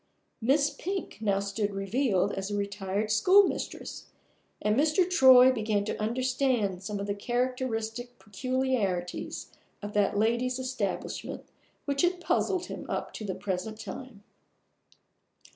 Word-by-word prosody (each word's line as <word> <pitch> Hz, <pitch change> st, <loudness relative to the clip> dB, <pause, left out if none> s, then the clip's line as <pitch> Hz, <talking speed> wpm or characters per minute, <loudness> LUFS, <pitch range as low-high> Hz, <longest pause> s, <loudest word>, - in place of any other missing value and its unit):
Miss 280 Hz, +5 st, +3 dB
Pink 380 Hz, -, -5 dB
now 200 Hz, -3 st, +2 dB
stood 200 Hz, +1 st, -2 dB
revealed 195 Hz, -1 st, +1 dB
as 195 Hz, +1 st, -3 dB
a 205 Hz, -, -2 dB
retired 200 Hz, +1 st, -2 dB
schoolmistress, 370 Hz, -, +2 dB, 0.5 s
and 210 Hz, 0 st, +1 dB
Mr. 310 Hz, +6 st, +3 dB
Troy 260 Hz, -7 st, +8 dB
began 215 Hz, -4 st, 0 dB
to 215 Hz, -, -3 dB
understand 245 Hz, -4 st, 0 dB
some 205 Hz, +1 st, -4 dB
of 200 Hz, -, -3 dB
the 200 Hz, -, -1 dB
characteristic 240 Hz, +1 st, -2 dB
peculiarities 210 Hz, -4 st, -2 dB, 0.3 s
of 205 Hz, 0 st, -7 dB
that 205 Hz, -1 st, +2 dB
lady's 235 Hz, +4 st, +1 dB
establishment 255 Hz, -7 st, -4 dB, 0.4 s
which 280 Hz, -1 st, 0 dB
had 355 Hz, 0 st, +2 dB
puzzled 365 Hz, +1 st, 0 dB
him -, -, -7 dB
up -, -, -3 dB
to -, -, -6 dB
the 195 Hz, -3 st, -3 dB
present 205 Hz, +3 st, -4 dB
time. 225 Hz, -2 st, -8 dB
225 Hz, 125 wpm, -29 LUFS, 200-260 Hz, 0.5 s, Troy